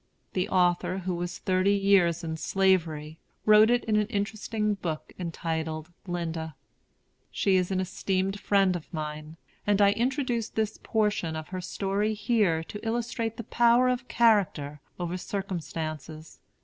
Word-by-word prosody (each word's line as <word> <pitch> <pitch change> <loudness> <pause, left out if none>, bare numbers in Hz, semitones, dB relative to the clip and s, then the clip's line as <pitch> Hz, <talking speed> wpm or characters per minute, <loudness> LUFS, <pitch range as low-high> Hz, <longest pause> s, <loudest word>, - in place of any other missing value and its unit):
The 185 +1 -1
author, 180 0 +2
who 185 -1 -2
was 175 0 -4
thirty 185 +2 +2
years 190 -4 +3
in 160 -1 -3
Slavery, 160 -4 0 0.3
wrote 215 +1 +7
it 245 0 +3
in 215 -2 +2
an 210 -1 +2
interesting 210 +1 -1
book 170 -6 -5
entitled 160 -1 -3 0.2
"Linda." 165 -3 -3 0.7
She 195 - +1
is 180 -1 +2
an 190 -1 0
esteemed 190 +1 -1
friend 195 -3 +3
of 170 - -7
mine; 155 0 -6 0.3
and 205 -1 +3
I 200 -1 +6
introduce 240 -1 -1
this 220 -1 -2
portion 210 -7 0
of 155 0 -6
her 185 -1 -4
story 200 +4 -1
here 205 -7 +1
to 210 +5 -9
illustrate 230 0 -2
the 235 - -5
power 240 +2 +4
of 250 0 -2
character 185 -11 +2 0.2
over 175 +1 -2
circumstances. 160 -5 -5
190 Hz, 145 wpm, -28 LUFS, 165-210 Hz, 0.7 s, wrote